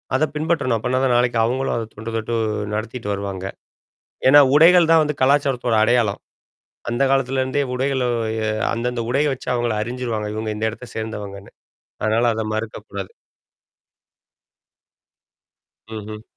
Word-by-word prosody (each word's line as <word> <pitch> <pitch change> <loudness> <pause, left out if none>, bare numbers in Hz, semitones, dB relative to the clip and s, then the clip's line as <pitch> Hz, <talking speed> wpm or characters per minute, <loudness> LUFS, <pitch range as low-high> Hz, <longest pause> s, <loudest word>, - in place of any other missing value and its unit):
அத 145 - +2
பின்பற்றணும். 150 -6 0
அப்பனா 125 +3 -1
தான் 130 -2 +3
நாளைக்கு 120 -1 +2
அவங்களும் 130 +4 0
அத 115 -2 -3
தொன்று, 110 +2 -7
தொட்டு 115 +1 -2 0.4
நடத்திட்டு 110 0 -4
வருவாங்க. 100 -2 -5 0.8
ஏன்னா, 145 +2 +8 0.2
உடைகள் 165 +2 +6
தான் 165 -1 +6
வந்து 150 -1 -2
கலாச்சாரத்தோட 130 -3 +2
அடையாளம். 115 -3 +2 0.7
அந்த 120 +3 0
காலத்துலருந்தே 135 +1 +1
உடைகள 130 0 0 0.4
அ - - 0 0.2
அந்தந்த 120 +1 -2
உடைய 140 +4 +2
வச்சு 130 - -7
அவங்கள 120 -1 0
அறிஞ்சுருவாங்க. 115 -2 -3
இவங்க 110 0 -3
இந்த 110 - -1
இடத்த 120 +2 -10
சேர்ந்தவங்கன்னு. 105 -3 -6 0.5
அதனால 115 +2 +2
அத 110 - -2
மறுக்கக்கூடாது. 105 -3 -6 2.8
ம்ஹும். 110 0 -7
120 Hz, 125 wpm, -21 LUFS, 110-130 Hz, 2.8 s, ஏன்னா